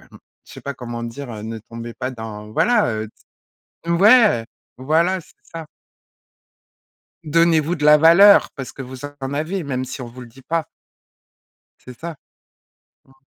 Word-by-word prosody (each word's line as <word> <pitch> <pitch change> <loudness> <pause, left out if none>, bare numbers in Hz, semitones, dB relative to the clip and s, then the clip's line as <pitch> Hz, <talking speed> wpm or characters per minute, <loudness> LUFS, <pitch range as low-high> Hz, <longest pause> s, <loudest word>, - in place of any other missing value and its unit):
je - - -18 0.3
sais - - -10
pas 140 - -6
comment 120 -2 -7
le 120 - -4
dire? 135 +2 -8
«Heu, 105 -1 -8
ne 110 +1 -6
tombez 115 +2 -9
pas 130 - -4
dans» 110 -3 -8
voilà, 240 - +3
heu, 110 0 -4 0.8
c 170 - -4
ouais! 205 - +5 0.3
Voilà, 165 +7 +1
c'est - - -21
ça. 165 -1 -9 1.6
Donnez-vous 165 +1 +2
de 150 -3 -1
la 150 0 +8
valeur 170 +6 +7
parce 135 -3 -7
que - - -8
vous 130 0 -10
en 140 -2 -7
avez, 160 +6 -2
même 130 -2 -3
si 130 +1 -7
on 120 - -7
vous 125 +2 -12
le 125 - -10
dit 130 +3 -17
pas. 165 +1 -2 1.1
C'est 125 -2 -13
ça. 165 -1 -7 0.9
Mmh. 135 - -23
140 Hz, 165 wpm, -20 LUFS, 120-165 Hz, 1.6 s, la